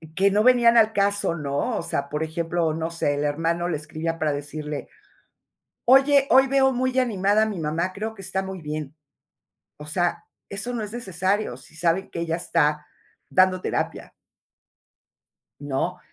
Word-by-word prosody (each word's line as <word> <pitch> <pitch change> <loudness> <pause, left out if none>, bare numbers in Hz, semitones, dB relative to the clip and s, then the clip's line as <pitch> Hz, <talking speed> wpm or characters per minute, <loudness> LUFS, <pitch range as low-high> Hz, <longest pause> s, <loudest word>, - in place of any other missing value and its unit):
que 195 +3 +4
no 205 +2 +2
venían 240 -1 +5
al 220 -1 +5
caso, 200 -3 +1
¿no? 145 -3 -2
O - - -1
sea, 140 - -2
por 150 +2 -2
ejemplo, 165 +1 -1
no 165 +1 -3
sé, 145 -3 0
el 145 - -2
hermano 165 +4 0
le 170 -3 -1
escribía 155 +2 -4
para 155 -1 +1
decirle: 145 +1 -5 1.0
"Oye, 275 +2 +5
hoy 265 +1 +6
veo 270 0 +3
muy 255 +1 -1
animada 205 -3 +2
a - - +3
mi 210 -4 -4
mamá, 165 +4 -1
creo 215 +3 -5
que 195 - -11
está 190 +1 -2
muy 190 -2 -6
bien". 150 -1 -5 0.8
O 150 - -10
sea, 170 +2 -1 0.2
eso 200 +5 -4
no 235 - -2
es 210 0 -6
necesario, 195 - -1
si 135 +4 -16
saben 170 +3 0
que 170 - -5
ella 165 -1 -1
está 150 -4 0 0.4
dando 185 0 +3
terapia, - - -3 1.5
¿no? 145 +6 -2
175 Hz, 165 wpm, -24 LUFS, 155-210 Hz, 1.5 s, hoy